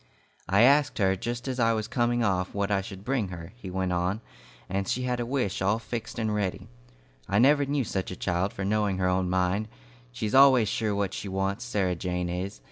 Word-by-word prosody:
"I 100 +4 +5
asked 140 +2 +4
her, 95 -2 +3
just 120 +6 -4
as 130 -1 -3
I 115 -1 +4
was 110 -1 -2
coming 120 -1 +1
off, 95 -3 0
what 100 0 -1
I 100 -1 +2
should 95 -1 -9
bring 125 -6 0
her," 90 +1 -9
he 110 -6 -9
went 95 0 -1
on, 90 +4 0 0.5
"and 95 +1 -2
she 125 - -1
had 125 -1 -1
a 120 - -2
wish 125 -9 -1
all 100 +3 +2
fixed 115 0 -6
and 110 -2 -1
ready. 100 -3 -2 0.6
I 100 - +2
never 140 +4 +5
knew 140 -1 0
such 95 -4 -3
a 90 - -5
child 90 +2 -1
for 95 - -4
knowing 105 -1 +1
her 95 -1 +1
own 90 0 +1
mind. 95 +3 +1 0.4
She's 105 - -3
always 130 -4 +7
sure 110 -2 -1
what 100 -1 -1
she 100 - -5
wants, 95 +1 -2
Sarah 95 -3 0
Jane 90 0 -2
is. 90 -2 -4
100 Hz, 215 wpm, -27 LUFS, 95-120 Hz, 0.6 s, always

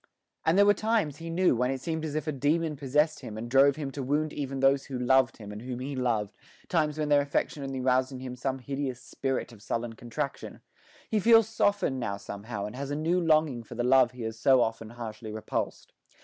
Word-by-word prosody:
And 165 +3 +4
there 200 - +7
were 205 - +6
times, 215 -10 0
he 165 0 -7
knew, 175 -2 +3
when 125 +2 +1
it 135 0 -2
seemed 160 +3 -3
as 150 -1 -4
if 155 - -1
a 155 - -1
demon 150 +3 0
possessed 150 +3 +1
him 110 - -8
and 115 +2 -5
drove 135 +3 +5
him 145 -3 -4
to 140 - -5
wound 150 +4 0
even 135 -2 -4
those 135 +1 +3
who 130 - -5
loved 130 +1 +3
him 105 -2 -9
and 105 +1 -7
whom 125 0 -5
he 135 +3 -4
loved 115 -5 0 0.4
times 155 -3 +1
when 150 -1 -1
their 145 -1 +5
affection 140 +1 -1
only 135 -1 -4
roused 130 +1 +2
in 130 - -7
him 130 -1 -6
some 130 +1 -2
hideous 135 -1 -4
spirit 130 0 -3
of 105 - -15
sullen 115 +2 -3
contradiction. 115 +1 -5 0.5
He 215 - +1
feels 225 +1 +6
softened 205 -11 +1
now 100 -5 -2
somehow, 100 +1 -6
and 105 - -7
has 140 +1 -5
a 145 - -2
new 165 +4 +1
longing 155 -6 +2
for 115 +1 -11
the 120 - -1
love 130 0 +5
he 125 -2 -7
has 110 0 -5
so 130 +1 +5
often 115 -1 -2
harshly 110 -2 -7
repulsed. 110 0 -4
135 Hz, 230 wpm, -28 LUFS, 120-150 Hz, 0.5 s, there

